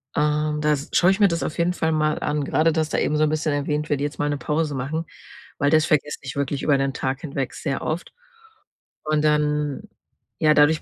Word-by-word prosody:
Ähm, 150 Hz, 0 st, +1 dB
da 150 Hz, -, +2 dB
s 140 Hz, 0 st, -4 dB
schaue 180 Hz, -, +5 dB
ich 195 Hz, -, -1 dB
mir 205 Hz, -, +6 dB
das 170 Hz, -2 st, -1 dB
auf 155 Hz, -, -4 dB
jeden 170 Hz, +1 st, +1 dB
Fall 160 Hz, -2 st, 0 dB
mal 155 Hz, -1 st, +1 dB
an, 150 Hz, 0 st, -1 dB
grade 155 Hz, +3 st, +2 dB
du 160 Hz, -, 0 dB
hast 155 Hz, -1 st, -2 dB
da -, -, +2 dB
eben 150 Hz, -, +1 dB
so 155 Hz, -, +3 dB
'n 155 Hz, -, +3 dB
bisschen 155 Hz, 0 st, 0 dB
erwähnt: 150 Hz, +1 st, -2 dB
„Werde 145 Hz, -1 st, 0 dB
jetzt 145 Hz, +1 st, -4 dB
mal 145 Hz, -, 0 dB
'ne 145 Hz, -, -1 dB
Pause 150 Hz, +2 st, -1 dB
machen“, 145 Hz, +6 st, -3 dB, 0.5 s
weil 145 Hz, -1 st, +2 dB
das 155 Hz, -1 st, +4 dB
vergesse 150 Hz, -1 st, 0 dB
ich 135 Hz, -1 st, -7 dB
wirklich 140 Hz, 0 st, -2 dB
über 145 Hz, -2 st, +3 dB
den 135 Hz, 0 st, 0 dB
Tag 135 Hz, 0 st, -3 dB
hinweg 140 Hz, -4 st, -4 dB
sehr 140 Hz, -3 st, -3 dB
oft. 160 Hz, +3 st, -4 dB, 0.9 s
Und 155 Hz, 0 st, 0 dB
dann 150 Hz, -1 st, +1 dB, 0.6 s
ja, 155 Hz, -1 st, +5 dB
dadurch 150 Hz, +1 st, +4 dB
150 Hz, 235 wpm, -23 LUFS, 145-155 Hz, 0.9 s, mir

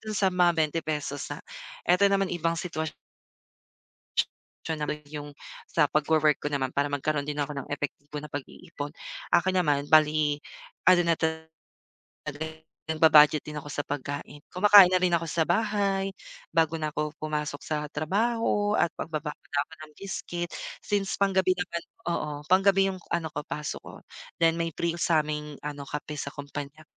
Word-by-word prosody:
dun 215 Hz, -, -2 dB
sa 195 Hz, -1 st, +3 dB
mga 180 Hz, -1 st, +4 dB
₱20 155 Hz, -2 st, -1 dB
ha, -, -, -4 dB, 0.5 s
eto 200 Hz, +3 st, +5 dB
naman 195 Hz, -2 st, +1 dB
ibang 165 Hz, -1 st, 0 dB
sitwasyon 160 Hz, -2 st, -3 dB, 1.7 s
optional 155 Hz, -2 st, -2 dB, 0.2 s
yung 145 Hz, 0 st, -6 dB, 0.4 s
sa 150 Hz, -3 st, +3 dB
pagwo-work 150 Hz, 0 st, +3 dB
ko 145 Hz, -, 0 dB
naman 130 Hz, -2 st, 0 dB
para 145 Hz, +1 st, +2 dB
magkaroon 145 Hz, +1 st, 0 dB
din 150 Hz, 0 st, -3 dB
ako 145 Hz, 0 st, -3 dB
ng 140 Hz, -, -5 dB
epektibo 145 Hz, 0 st, -4 dB
na 150 Hz, -, -8 dB
pag-iipon, 145 Hz, +1 st, -7 dB, 0.4 s
akin 185 Hz, +2 st, +3 dB
naman 145 Hz, -5 st, +2 dB
bali, 155 Hz, -1 st, +4 dB, 0.5 s
ano 185 Hz, -1 st, +7 dB
na 165 Hz, -, +3 dB
talaga 160 Hz, 0 st, -2 dB, 1.4 s
nagba-budget 155 Hz, -1 st, +6 dB
din 150 Hz, 0 st, -6 dB
ako 145 Hz, -, -14 dB
sa 145 Hz, 0 st, -2 dB
pagkain, 145 Hz, +1 st, -5 dB
kumakain 200 Hz, 0 st, +8 dB
na 185 Hz, -, +4 dB
rin 180 Hz, -1 st, +3 dB
ako 165 Hz, 0 st, +1 dB
sa 160 Hz, +2 st, +1 dB
bahay, 195 Hz, +1 st, +1 dB, 0.4 s
bago 165 Hz, 0 st, +3 dB
na 155 Hz, -1 st, -2 dB
ako 150 Hz, 0 st, -1 dB
pumasok 150 Hz, -1 st, -3 dB
sa 155 Hz, -, -2 dB, 0.2 s
trabaho 205 Hz, +5 st, +1 dB
at -, -, +4 dB
magbabaon 150 Hz, -2 st, -4 dB, 0.2 s
na 145 Hz, -, +1 dB
ako -, -, -23 dB
ng 150 Hz, -, -17 dB
biscuit 175 Hz, -3 st, -4 dB, 0.3 s
since 200 Hz, -2 st, -1 dB
pang-gabi 190 Hz, -2 st, +3 dB
naman 170 Hz, -1 st, -3 dB, 0.3 s
oo 155 Hz, -3 st, -1 dB, 0.2 s
pang-gabi 195 Hz, +2 st, +4 dB
yung 185 Hz, -, -6 dB
ano 165 Hz, -2 st, 0 dB
ko 150 Hz, -, -2 dB
pasok 150 Hz, 0 st, -4 dB
ko, -, -, -11 dB, 0.5 s
then 165 Hz, 0 st, +5 dB
may 165 Hz, 0 st, -1 dB
free 170 Hz, 0 st, -1 dB
sa'ming 150 Hz, -4 st, 0 dB
ano 145 Hz, -1 st, -5 dB
kape 150 Hz, +2 st, -5 dB
sa 140 Hz, -, -3 dB
kumpanya, 145 Hz, +1 st, -7 dB
155 Hz, 155 wpm, -27 LUFS, 150-180 Hz, 1.7 s, kumakain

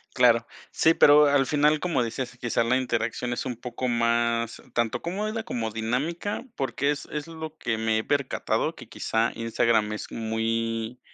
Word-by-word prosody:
Claro, 120 Hz, -2 st, +5 dB, 0.3 s
sí, 160 Hz, -, +4 dB
pero 150 Hz, 0 st, +7 dB
al 140 Hz, -2 st, +3 dB
final, 150 Hz, 0 st, +3 dB
como 155 Hz, -7 st, 0 dB
decías, 125 Hz, +2 st, -4 dB
quizá 115 Hz, -1 st, +1 dB
la 125 Hz, +2 st, +2 dB
interacción 120 Hz, -1 st, -1 dB
es 120 Hz, -, -3 dB
un 125 Hz, -, -2 dB
poco 120 Hz, +1 st, -5 dB
más, 115 Hz, -1 st, +1 dB
tanto 120 Hz, +1 st, 0 dB
cómoda, 215 Hz, +6 st, -3 dB
como 115 Hz, -, -3 dB
dinámica, 135 Hz, -, -2 dB
porque 135 Hz, +2 st, 0 dB
es 145 Hz, -, -3 dB
es 150 Hz, +1 st, -4 dB
lo 160 Hz, -1 st, -7 dB
que 115 Hz, -2 st, -1 dB
me 110 Hz, 0 st, +1 dB
he 110 Hz, -, -2 dB
percatado, 140 Hz, -2 st, 0 dB
que -, -, -12 dB
quizá 115 Hz, +1 st, 0 dB
Instagram 115 Hz, -2 st, +1 dB
es 105 Hz, -, -6 dB
muy 115 Hz, +1 st, -2 dB
120 Hz, 165 wpm, -26 LUFS, 115-145 Hz, 0.3 s, pero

